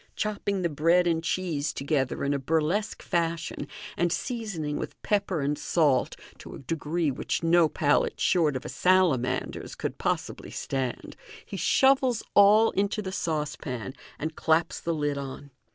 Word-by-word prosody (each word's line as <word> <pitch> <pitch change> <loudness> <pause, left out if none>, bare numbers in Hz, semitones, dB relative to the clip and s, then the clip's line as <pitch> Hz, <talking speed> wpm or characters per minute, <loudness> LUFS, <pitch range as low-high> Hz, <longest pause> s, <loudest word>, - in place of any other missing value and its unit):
Chopping 200 -2 -2
the - - +3
bread 165 +4 +3
and 165 -1 +1
cheese 160 -4 -1
together 135 -2 -1
in 140 0 +1
a 140 - -1
burlesque 160 +9 0
fashion, 165 -2 -2 0.3
and 175 -1 +1
seasoning 195 - -3
with - - -6
pepper 200 -6 0
and 145 +2 0
salt 145 -6 +2 0.2
to - - -9
a - - -8
degree 160 +2 -1
which 135 - -3
no 165 -1 +4
palate 145 -1 +1
short 160 -6 +2
of 130 - -4
a - - -5
salamander's 175 -9 +1
could - - -4
possibly - - -2
stand, 130 -3 -4 0.3
he - - -7
shovels 265 -4 +3
all 210 +3 +6
into 205 +2 -1
the 190 - -4
saucepan, 150 - -3 0.2
and 155 +1 -4
claps 160 +1 +1
the 170 -1 -2
lid 145 -2 -1
on. 140 +1 -8
165 Hz, 150 wpm, -27 LUFS, 145-185 Hz, 0.3 s, all